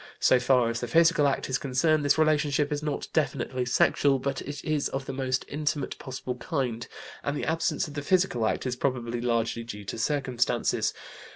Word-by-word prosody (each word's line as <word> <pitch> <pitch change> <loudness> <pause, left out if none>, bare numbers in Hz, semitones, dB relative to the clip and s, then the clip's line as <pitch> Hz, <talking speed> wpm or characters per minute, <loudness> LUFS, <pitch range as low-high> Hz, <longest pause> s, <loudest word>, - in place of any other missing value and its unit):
So 130 - +5
far 125 -1 +3
as 115 - -3
the 120 - -3
physical 165 +1 +4
act 140 - -1
is 130 - 0
concerned 150 +3 +2
this 145 +1 +3
relationship 150 -2 +2
is 145 0 -1
not 150 -2 -3
definitely 130 -4 0
sexual, 135 +2 +3
but 135 +1 -3
it 145 +1 -7
is 155 -2 0
of 135 0 -4
the - - -5
most 130 -1 -1
intimate 150 -1 -2
possible 130 -1 -5
kind, 125 -5 -2 0.4
and 145 +1 -1
the - - -3
absence 160 0 0
of 150 - -9
the 145 - -3
physical 175 - +2
act - - -1
is 125 -1 -1
probably 120 -3 -2
largely 115 -1 0
due 105 -3 -8
to 110 - -5
circumstances. 130 -2 0
135 Hz, 190 wpm, -27 LUFS, 125-150 Hz, 0.4 s, So